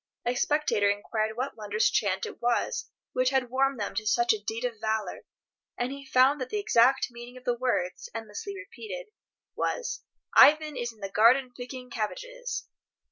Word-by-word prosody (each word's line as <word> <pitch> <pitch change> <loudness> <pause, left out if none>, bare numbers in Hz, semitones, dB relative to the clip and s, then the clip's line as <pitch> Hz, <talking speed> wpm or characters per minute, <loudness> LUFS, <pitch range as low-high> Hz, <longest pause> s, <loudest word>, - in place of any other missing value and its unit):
A 240 - +1
spectator 270 -6 +2
inquired 215 +2 -1
what 260 +3 -2
wondrous 210 0 +1
chant 190 -3 +1
it - - -9
was 240 0 0 0.2
which 255 0 +2
had 260 -2 0
warmed 270 0 +1
them 205 - -3
to 215 -1 -3
such 240 +2 +4
a 215 - -4
deed 225 +3 -3
of 235 -3 -3
valour, 220 -1 -2 0.5
and 245 +1 -1
he 275 0 -8
found 265 +2 +4
that 255 - -3
the - - -2
exact 270 - +4
meaning 240 +1 -10
of 250 - -13
the 245 -1 +1
words, 235 -7 -1
endlessly 225 - -6
repeated, 435 +4 -8 0.4
was 485 - -2 0.3
"Ivan 305 0 +7
is 240 -1 -3
in 220 -2 -22
the 195 - -4
garden 245 +5 +4
picking 250 0 -8
cabbages." - - -4
245 Hz, 175 wpm, -28 LUFS, 220-270 Hz, 0.5 s, Ivan